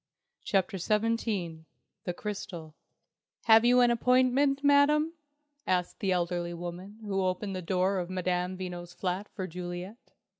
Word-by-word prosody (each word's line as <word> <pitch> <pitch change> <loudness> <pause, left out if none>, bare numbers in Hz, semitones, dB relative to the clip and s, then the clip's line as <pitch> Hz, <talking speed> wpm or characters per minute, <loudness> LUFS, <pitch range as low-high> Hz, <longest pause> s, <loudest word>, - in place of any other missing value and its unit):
CHAPTER 195 0 0
XVII 210 -5 -1 0.4
THE 180 - -2
CRYSTAL 175 -7 -6 0.7
"Have 225 0 +7
you 250 +1 +5
an 240 -1 +5
appointment, 255 +3 +3
Madam?" 295 +3 +4 0.5
asked 180 -1 0
the 195 - 0
elderly 175 -1 -1
woman 175 +4 -7
who 195 -2 -1
opened 185 +2 -2
the 185 - -3
door 185 +2 +1
of 175 -1 -4
Madame 185 0 -1
Veno's 175 -1 -6
flat 185 +3 -3
for 190 - -3
Juliet. 180 +3 -6
185 Hz, 135 wpm, -29 LUFS, 180-225 Hz, 0.7 s, Have